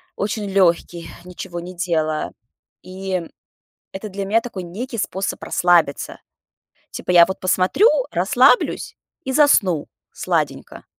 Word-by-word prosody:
очень 205 +1 -3
лёгкий, 170 -2 +1 0.2
ничего 175 -1 -7
не 180 +2 -8
делая. 160 -3 -1 0.5
И 185 -1 -4 0.7
это 195 +3 -6
для 195 0 -5
меня 220 +4 +2
такой 220 -6 -7
некий 230 +8 -6
способ 190 0 -3
расслабиться. 175 -5 +1 0.7
Типа - - -4
я 175 -1 +8
вот 190 +2 -5
посмотрю, 185 - +3 0.2
расслаблюсь - - +2 0.3
и 265 - -2
засну 200 - +3 0.3
сладенько. - - -3
185 Hz, 115 wpm, -20 LUFS, 175-200 Hz, 0.7 s, я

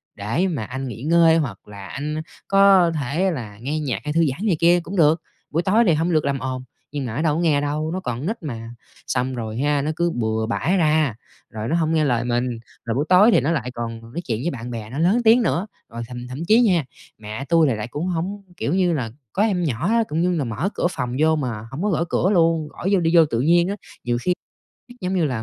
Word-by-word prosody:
để 115 - 0
mà 150 -11 -2
anh 130 +3 -5
nghỉ 120 +1 -7
ngơi 165 0 +5
hoặc 120 -13 -3
là 100 -2 -9
anh 150 +3 -4 0.3
có 195 -3 +5
thể 160 +8 0
là 110 -9 -6
nghe 150 +5 -2
nhạc 140 -5 -2
hay 150 0 -3
thư 165 0 +3
giãn 190 +11 -5
này 180 - +3
kia 175 +1 +5
cũng 175 +4 -7
được. 160 0 +4 0.3
Buổi 165 +3 0
tối 215 +6 +4
thì 165 - +5
hông 165 +3 0
được 155 -2 +2
làm 140 -1 0
ồn." 130 0 -4 0.3
Nhưng 140 -2 -3
mà 115 -1 -5
nó 150 - -1
đâu 155 -2 +2
có - - -1
nghe 150 -4 +2
đâu, 150 +2 -2
nó 185 - -2
còn 125 -5 -4
nít 220 0 -3
mà. 115 -5 -6 0.4
Xong 130 +1 -1
rồi 110 -1 -5
ha, 145 +1 +1
nó 150 - -1
cứ 170 0 +1
bừa 110 -1 0
bãi 170 +11 0
ra, 155 -7 +2 0.3
rồi 110 +1 -5
nó 165 - +1
hông 165 -1 +1
nghe 155 -2 +3
lời 120 -3 +1
mình, 120 -1 -1 0.3
rồi 115 0 -1
buổi 145 +3 0
tối 200 +6 +7
thì - - +4
nó 145 +6 0
lại 125 -6 -2
còn 115 -1 -5
nói 120 +10 -7
chuyện 110 -3 0
với 175 - 0
bạn 120 -1 -6
bè 110 -2 -6
nó 135 +5 -5
lớn 195 +9 +3
tiếng 230 +3 +6
nữa. 205 -2 0 0.2
Rồi 115 +1 -7
thậm 125 0 -7
thậm 140 +7 -5
chí 225 +5 +6
nha, 180 - +3 0.3
mẹ 110 +5 -6
tui 165 -2 +4
thì 125 - 0
lại 110 +1 -4
cũng 150 +8 -4
hổng 185 +4 -3
kiểu 145 - -1
như 180 -2 +2
là, 125 -7 -2 0.2
có 205 - +2
em 190 -5 +1
nhỏ 150 - -1
á, 230 +1 +3
cũng 160 +2 -1
như 180 +1 +2
là 150 - 0
mở 125 - -2
cửa - - +1
phòng 125 -4 -3
vô 160 +1 +4
mà 115 -6 -4
hổng 155 +8 -4
có 210 - +1
gõ 170 -2 +1
cửa 185 - +2
luôn, 165 -3 +2
khỏi 190 - -4
vô 190 - +4
đi 165 -1 +1
vô 165 - +7
tự 120 -6 -1
nhiên 170 +5 +4
á. 200 - -2 0.3
Nhiều 120 0 0
khi 180 - +1 0.7
giống 185 +1 -2
như 175 -3 +2
là 125 -6 -2
150 Hz, 260 wpm, -22 LUFS, 125-175 Hz, 0.7 s, tối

